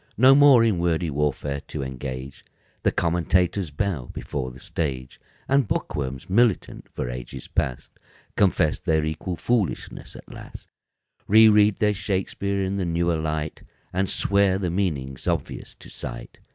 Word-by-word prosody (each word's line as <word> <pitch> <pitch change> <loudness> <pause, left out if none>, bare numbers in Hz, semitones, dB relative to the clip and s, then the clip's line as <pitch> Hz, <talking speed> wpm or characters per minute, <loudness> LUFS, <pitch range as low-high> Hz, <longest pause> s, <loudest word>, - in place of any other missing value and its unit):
No 130 +4 +7
more 140 -4 +7
in 110 -6 +2
wordy 85 -1 0
warfare 70 -1 -1
to - - -5
engage, 65 0 -6 0.4
The - - +2
commentators 90 +2 +1
bow 75 -4 -2
before 65 -3 -4
the 65 +1 -13
stage, 65 -5 -4 0.3
And 140 -3 +3
bookworms, 65 -6 -3
militant 110 +1 +1
for - - -4
ages - - -7
past, 60 - -2 0.4
Confess 90 -6 +2
their 80 -3 +1
equal 80 +4 -3
foolishness 110 +4 -2
at - - -12
last, - - -11 0.6
Reread 105 -1 +6
their 105 -1 +2
Shakspeare 100 0 -2
in 95 +1 -2
the 95 - -1
newer 85 0 0
light 80 -1 -3 0.3
And 95 +1 0
swear 100 -1 +2
the 90 -3 -2
meaning's 75 -9 -2
obvious 85 -5 -3
to - - -15
sight. - - -8
85 Hz, 140 wpm, -24 LUFS, 70-100 Hz, 0.6 s, No